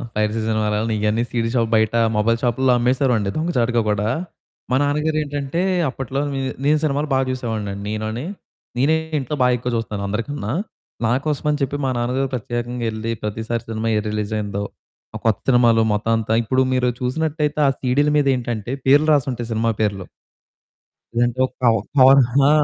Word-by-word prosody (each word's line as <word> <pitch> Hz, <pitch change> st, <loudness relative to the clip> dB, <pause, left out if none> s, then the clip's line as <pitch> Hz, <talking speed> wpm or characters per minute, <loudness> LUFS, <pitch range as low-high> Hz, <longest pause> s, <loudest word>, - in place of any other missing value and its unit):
Piracy 105 Hz, +1 st, 0 dB
సినిమాలన్ని, 110 Hz, 0 st, 0 dB
ఇయన్నీ 110 Hz, +2 st, +1 dB
CD 115 Hz, -1 st, 0 dB
shop 115 Hz, -2 st, +1 dB
బయట 110 Hz, 0 st, +2 dB, 0.2 s
mobile 115 Hz, +2 st, +2 dB
షాపుల్లో 125 Hz, +1 st, +2 dB
అమ్మేసేవోరమండి 125 Hz, -4 st, +1 dB
దొంగచాటుగా 125 Hz, -8 st, +1 dB
గుడా. 105 Hz, +1 st, 0 dB, 0.6 s
మా -, -, +3 dB
నాన్నగారు 150 Hz, +2 st, 0 dB
ఏంటంటే 145 Hz, +3 st, -3 dB, 0.3 s
అప్పట్లో, 135 Hz, +1 st, -4 dB
మే 135 Hz, -, -2 dB, 0.3 s
నేను 150 Hz, +1 st, +4 dB
సినిమాలు 145 Hz, 0 st, 0 dB
బా 130 Hz, -, +3 dB
చూసేవాడిని 110 Hz, -5 st, -3 dB
అండి 100 Hz, 0 st, -7 dB
నేనుని. 110 Hz, +4 st, -3 dB, 0.5 s
నేనే 145 Hz, +5 st, +3 dB, 0.2 s
ఇంట్లో 135 Hz, +3 st, -3 dB
బా 125 Hz, -, +5 dB
ఎక్కువ 125 Hz, +1 st, -3 dB
చూస్తాను 105 Hz, -3 st, -4 dB
అందరికన్నా. 110 Hz, +2 st, -3 dB, 0.5 s
నాకోసమని 145 Hz, +4 st, 0 dB
చెప్పి 135 Hz, +1 st, -1 dB
మా -, -, +1 dB
నాన్నగారు 125 Hz, +3 st, -1 dB
ప్రత్యేకంగా 120 Hz, 0 st, -3 dB
యెళ్లి, 110 Hz, +1 st, -4 dB
ప్రతిసారి 110 Hz, +2 st, -3 dB
సినిమా 110 Hz, 0 st, -2 dB
ఏది 105 Hz, 0 st, -2 dB
రిలీజ్ 105 Hz, 0 st, -3 dB
అయిందో, 100 Hz, -1 st, -3 dB, 0.5 s
ఆ -, -, -1 dB
కొత్త 110 Hz, -3 st, +2 dB
సినిమాలు 120 Hz, -2 st, +5 dB
మొత్తం 105 Hz, +2 st, -1 dB
అంతా 110 Hz, 0 st, -1 dB
ఇప్పుడు 130 Hz, +3 st, +1 dB
మీరు 125 Hz, -1 st, +2 dB
చూసినట్టయితే 150 Hz, +3 st, -1 dB
ఆ -, -, +5 dB
సీడీల 140 Hz, +3 st, +2 dB
మీద 145 Hz, -2 st, +2 dB
ఏంటంటే 120 Hz, -2 st, -4 dB, 0.2 s
పేర్లు 145 Hz, +3 st, +5 dB
రాసుంటాయి 125 Hz, -4 st, 0 dB
సినిమా 115 Hz, +1 st, +1 dB
పేర్లు. 100 Hz, -3 st, -1 dB, 1.1 s
లేదంటే 120 Hz, +1 st, +1 dB
ఒక 130 Hz, -, -16 dB
కవ్ 115 Hz, -1 st, +5 dB, 0.2 s
కవర్, 135 Hz, +1 st, +8 dB, 0.3 s
ఆ! -, -, +5 dB
120 Hz, 160 wpm, -21 LUFS, 110-135 Hz, 1.1 s, కవర్